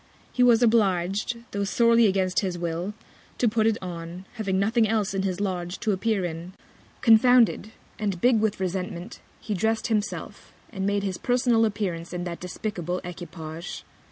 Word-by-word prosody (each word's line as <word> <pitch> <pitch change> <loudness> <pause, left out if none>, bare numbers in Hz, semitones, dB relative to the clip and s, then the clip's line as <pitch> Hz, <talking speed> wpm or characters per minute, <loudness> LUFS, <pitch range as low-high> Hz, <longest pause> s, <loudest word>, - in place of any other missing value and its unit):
He 250 - 0
was 240 -1 +6
oblig'd, 210 0 +1
tho' 200 0 -1
sorely 230 +3 +4
against 190 -2 +1
his 185 -3 -2
Will, 175 +4 -3 0.4
to 245 - +2
put 220 0 +2
it 225 -1 +2
on, 175 +1 -7
having 200 -5 -1
nothing 220 +3 +2
else 215 -2 0
in 195 - 0
his 190 -1 -2
Lodge 180 -3 -3
to 220 - +1
appear 200 0 0
in: 170 +2 -6 0.5
Confounded, 230 -1 +5 0.3
and 200 -4 -2
big 240 +2 +4
with 215 -2 0
Resentment, 185 +1 -4 0.2
he 215 - -4
drest 220 +5 0
himself, 215 -1 -3 0.2
and 195 -3 -2
made 200 0 0
his 190 -3 -3
personal 245 -2 +2
Appearance 185 -6 -3
in 175 0 -3
that 175 -1 -5
despicable 180 -1 -4
Equipage. 170 -1 -7
200 Hz, 160 wpm, -25 LUFS, 180-225 Hz, 0.5 s, was